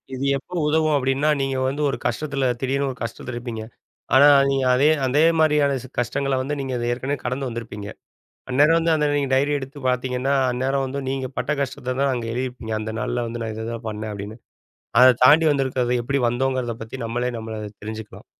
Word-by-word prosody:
இது 130 Hz, -, -5 dB
எப்போ 160 Hz, +6 st, -13 dB
உதவும் 155 Hz, 0 st, +2 dB
அப்படின்னா, 135 Hz, +2 st, +1 dB
நீங்க 135 Hz, -1 st, -1 dB
வந்து 140 Hz, +3 st, -2 dB
ஒரு -, -, -2 dB
கஷ்டத்தில 140 Hz, +2 st, -1 dB, 0.2 s
திடீர்னு 135 Hz, +1 st, 0 dB
ஒரு 125 Hz, -, -11 dB
கஷ்டத்தில் 115 Hz, +2 st, -5 dB
இருப்பீங்க. 120 Hz, -2 st, -5 dB, 0.5 s
ஆனா, 140 Hz, +2 st, +8 dB, 0.2 s
நீங்க 135 Hz, -1 st, +1 dB
அதே 140 Hz, +4 st, +4 dB, 0.2 s
அதே 145 Hz, +4 st, +3 dB, 0.2 s
மாதிரியான 150 Hz, -3 st, +3 dB
சி -, -, -9 dB
கஷ்டங்கள 135 Hz, +3 st, 0 dB
வந்து 145 Hz, +3 st, -2 dB
நீங்க 135 Hz, -1 st, -4 dB, 0.2 s
ஏற்கனவே 135 Hz, +3 st, -2 dB
கடந்து 130 Hz, +2 st, -2 dB
வந்திருப்பீங்க. 110 Hz, -3 st, -6 dB, 0.6 s
அந்நேரம் 145 Hz, +6 st, +4 dB
வந்து 165 Hz, 0 st, +2 dB
அந்த 150 Hz, -1 st, +1 dB
நீங்க 140 Hz, -2 st, 0 dB
டைரி 140 Hz, +2 st, +2 dB
எடுத்து 140 Hz, +1 st, -8 dB
பார்த்தீங்கன்னா, 125 Hz, +1 st, 0 dB, 0.2 s
அந்நேரம் 135 Hz, +2 st, 0 dB
வந்து 135 Hz, +2 st, -4 dB
நீங்க 130 Hz, -1 st, -2 dB
பட்ட 125 Hz, +3 st, -1 dB
கஷ்டத்த 130 Hz, -1 st, -3 dB
தான் 140 Hz, -1 st, +2 dB
அங்க 120 Hz, -2 st, -3 dB
எழுதிருப்பீங்க. 125 Hz, -2 st, -4 dB
அந்த 110 Hz, 0 st, -4 dB
நாள்ல 120 Hz, +2 st, -2 dB
வந்து, 115 Hz, 0 st, -5 dB
“நான் 110 Hz, -1 st, -4 dB
இததான் 115 Hz, +1 st, -5 dB
பண்ணேன்” 105 Hz, 0 st, -5 dB
அப்படின்னு. 105 Hz, +2 st, -7 dB, 0.6 s
அத 130 Hz, -1 st, +8 dB
தாண்டி 155 Hz, +4 st, +7 dB
வந்திருக்கிறது 130 Hz, -3 st, 0 dB
எப்படி 140 Hz, +3 st, 0 dB
வந்தோங்கிறத 120 Hz, -2 st, -2 dB
நம்மளே 120 Hz, +2 st, -1 dB
நம்மள 110 Hz, 0 st, -6 dB
அத 105 Hz, -, -6 dB
தெரிஞ்சுக்கலாம். 110 Hz, 0 st, -8 dB
130 Hz, 180 wpm, -22 LUFS, 120-140 Hz, 0.6 s, ஆனா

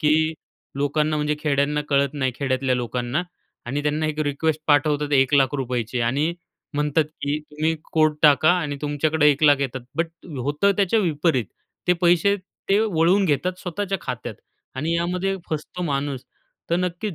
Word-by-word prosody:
की 155 Hz, +1 st, +3 dB, 0.5 s
लोकांना 150 Hz, +2 st, +1 dB
म्हणजे 150 Hz, 0 st, 0 dB
खेड्यांना 145 Hz, 0 st, +1 dB
कळत 140 Hz, 0 st, +2 dB
नाही, 130 Hz, -3 st, 0 dB
खेड्यातल्या 130 Hz, -1 st, 0 dB
लोकांना, 125 Hz, +4 st, -2 dB, 0.4 s
आणि 140 Hz, +4 st, -2 dB
त्यांना 150 Hz, +1 st, 0 dB
एक 155 Hz, 0 st, -3 dB
रिक्वेस्ट 155 Hz, +2 st, -1 dB
पाठवतात 145 Hz, 0 st, +2 dB
₹1,00,000ची 130 Hz, -3 st, +1 dB
आणि 140 Hz, +8 st, +1 dB, 0.4 s
म्हणतात 150 Hz, +2 st, +1 dB, 0.2 s
की 145 Hz, +1 st, -1 dB
तुम्ही 155 Hz, +2 st, 0 dB, 0.2 s
कोड 155 Hz, -1 st, +3 dB
टाका 150 Hz, +1 st, +6 dB
आणि 145 Hz, -4 st, -3 dB
तुमच्याकडे 150 Hz, +1 st, +1 dB
₹1,00,000 145 Hz, -1 st, +4 dB
येतात, 130 Hz, -1 st, -5 dB, 0.2 s
बट 165 Hz, +1 st, +1 dB, 0.4 s
होतं 145 Hz, +9 st, +2 dB
त्याच्या 200 Hz, +2 st, +2 dB
विपरीत, 155 Hz, -, +1 dB, 0.4 s
ते -, -, +7 dB
पैसे 175 Hz, +3 st, +3 dB, 0.3 s
ते 195 Hz, -, +4 dB
वळवून 190 Hz, -1 st, +3 dB
घेतात 180 Hz, +4 st, 0 dB
स्वतःच्या 195 Hz, +1 st, -3 dB
खात्यात 120 Hz, -3 st, -5 dB, 0.4 s
आणि 155 Hz, +6 st, -1 dB
यामध्ये 180 Hz, +3 st, -1 dB
फसतो 160 Hz, +3 st, -4 dB
माणूस. 140 Hz, -4 st, -2 dB, 0.5 s
तर 170 Hz, -, +3 dB
नक्कीच 180 Hz, +2 st, -2 dB
150 Hz, 145 wpm, -23 LUFS, 140-170 Hz, 0.5 s, ते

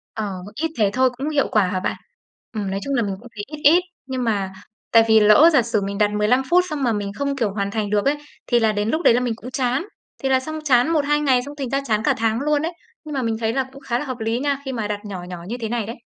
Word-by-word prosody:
Ờ, 200 Hz, -4 st, -4 dB
ít 320 Hz, +5 st, -2 dB
thế 210 Hz, -3 st, +3 dB
thôi 260 Hz, +2 st, +3 dB
cũng 280 Hz, +4 st, -2 dB
hiệu 295 Hz, -3 st, +1 dB
quả 210 Hz, -4 st, +3 dB
hả 185 Hz, +1 st, -1 dB
bạn? -, -, -2 dB, 0.6 s
Ừm, 205 Hz, -4 st, -3 dB
nói 195 Hz, -, -2 dB
chung 280 Hz, -, -3 dB
là 245 Hz, -, +2 dB
mình 200 Hz, -3 st, -2 dB
cũng 245 Hz, -, -13 dB
thấy 205 Hz, -, -5 dB
ít 300 Hz, +1 st, -9 dB
ít, 315 Hz, +5 st, +7 dB, 0.3 s
nhưng 260 Hz, -1 st, -3 dB
mà 200 Hz, -5 st, -1 dB, 0.4 s
tại 230 Hz, -1 st, +7 dB
vì 220 Hz, 0 st, +6 dB
lỡ 215 Hz, +10 st, +7 dB
giả 270 Hz, -, +6 dB
sử 225 Hz, -2 st, -1 dB
mình 200 Hz, 0 st, -3 dB
đặt 210 Hz, 0 st, +2 dB
15 210 Hz, +5 st, +2 dB
phút 360 Hz, +1 st, +5 dB
xong 300 Hz, -3 st, -3 dB
mà 240 Hz, -3 st, +2 dB
mình 205 Hz, -1 st, -3 dB
không, 280 Hz, +4 st, -2 dB
kiểu, 225 Hz, -6 st, 0 dB
hoàn 200 Hz, -1 st, -2 dB
thành 215 Hz, -1 st, -2 dB
được 205 Hz, 0 st, +1 dB
ấy, 280 Hz, +2 st, +3 dB, 0.3 s
thì 240 Hz, -, +3 dB
là 220 Hz, -1 st, +3 dB
đến 210 Hz, +1 st, -1 dB
lúc 315 Hz, +7 st, 0 dB
đấy 240 Hz, -, +6 dB
là 240 Hz, -, +3 dB
mình 245 Hz, -3 st, -1 dB
cũng 250 Hz, +2 st, -10 dB
chán. 255 Hz, +2 st, 0 dB, 0.4 s
Thì 270 Hz, -, +1 dB
là 260 Hz, -1 st, +4 dB
xong 310 Hz, +4 st, -6 dB
chán 260 Hz, -1 st, +3 dB
1-2 295 Hz, -2 st, +2 dB
ngày 265 Hz, -4 st, +3 dB
xong 285 Hz, +1 st, -8 dB
thành 270 Hz, -3 st, -3 dB
ra 275 Hz, +2 st, 0 dB
chán 215 Hz, -2 st, 0 dB
cả -, -, +3 dB
tháng 225 Hz, 0 st, +1 dB
luôn 295 Hz, 0 st, +1 dB
ấy. 325 Hz, +2 st, -2 dB, 0.3 s
Nhưng 305 Hz, -2 st, -7 dB
mà 270 Hz, -, -1 dB
mình 225 Hz, -2 st, -1 dB
thấy 225 Hz, 0 st, 0 dB
là 265 Hz, +1 st, +1 dB
cũng 275 Hz, -, -12 dB
khá 245 Hz, -3 st, -1 dB
là -, -, -4 dB
hợp 255 Hz, -3 st, -5 dB
lý 225 Hz, +2 st, -1 dB
nha, 280 Hz, 0 st, -1 dB
khi 265 Hz, -, -3 dB
mà 225 Hz, -5 st, -3 dB
đặt 205 Hz, -1 st, -3 dB
nhỏ 190 Hz, -3 st, -6 dB
nhỏ 180 Hz, -1 st, -8 dB
như 235 Hz, +4 st, -4 dB
thế 225 Hz, -, -2 dB
này 230 Hz, -2 st, -1 dB
đấy. 230 Hz, -, -6 dB
240 Hz, 300 wpm, -22 LUFS, 210-275 Hz, 0.6 s, ít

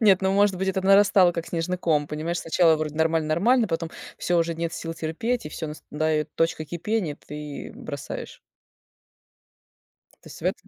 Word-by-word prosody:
Нет, 200 Hz, -4 st, +5 dB
ну, 190 Hz, 0 st, +2 dB
может 200 Hz, -1 st, +3 dB
быть, 190 Hz, +1 st, -1 dB
это 190 Hz, 0 st, 0 dB
нарастало 195 Hz, -2 st, +6 dB
как 170 Hz, 0 st, -4 dB
снежный 175 Hz, +2 st, -2 dB
ком, 150 Hz, -4 st, +1 dB
понимаешь, 160 Hz, +4 st, -3 dB
сначала 165 Hz, 0 st, +4 dB
вроде 155 Hz, -1 st, -3 dB
нормально 160 Hz, -1 st, +1 dB
нормально, 225 Hz, +9 st, +3 dB
потом- 165 Hz, 0 st, -2 dB, 0.3 s
всё, 175 Hz, -1 st, +1 dB
уже 165 Hz, 0 st, +1 dB
нет 165 Hz, +1 st, -3 dB
сил 165 Hz, -1 st, -5 dB
терпеть, 165 Hz, +7 st, -2 dB
и, -, -, -4 dB
всё, 160 Hz, +1 st, -5 dB
настает 155 Hz, 0 st, -2 dB
точка 165 Hz, -1 st, 0 dB
кипения, 170 Hz, -1 st, -2 dB
ты 150 Hz, -1 st, -7 dB
бросаешь. -, -, -7 dB, 1.8 s
То -, -, -22 dB
есть -, -, -11 dB
в -, -, -11 dB
этом -, -, -2 dB
165 Hz, 175 wpm, -25 LUFS, 155-190 Hz, 1.8 s, нарастало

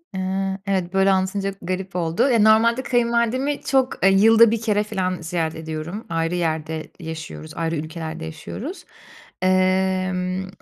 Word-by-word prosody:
Eee, 190 Hz, +1 st, -2 dB
evet, 190 Hz, -2 st, -1 dB
böyle 195 Hz, 0 st, +4 dB
anlatınca 195 Hz, +1 st, 0 dB
garip 185 Hz, +1 st, -4 dB
oldu. 170 Hz, +9 st, +1 dB
Ya, 235 Hz, -3 st, +3 dB
normalde 225 Hz, +4 st, +4 dB
kayınvalidemi 240 Hz, +3 st, +1 dB
çok, 265 Hz, -6 st, 0 dB
eee, -, -, +7 dB
yılda 225 Hz, +3 st, +6 dB
1 230 Hz, -1 st, -1 dB
kere 210 Hz, -2 st, +1 dB
filan 185 Hz, -4 st, -2 dB
ziyaret 165 Hz, -1 st, -2 dB
ediyorum, 160 Hz, +6 st, -6 dB
ayrı 165 Hz, +1 st, -1 dB
yerde 160 Hz, -2 st, -2 dB
yaşıyoruz, 160 Hz, -1 st, -7 dB
ayrı 165 Hz, 0 st, -1 dB
ülkelerde 160 Hz, +1 st, -5 dB
yaşıyoruz. 235 Hz, -, -7 dB, 0.6 s
Emm, 185 Hz, 0 st, +1 dB
185 Hz, 135 wpm, -22 LUFS, 165-215 Hz, 0.6 s, eee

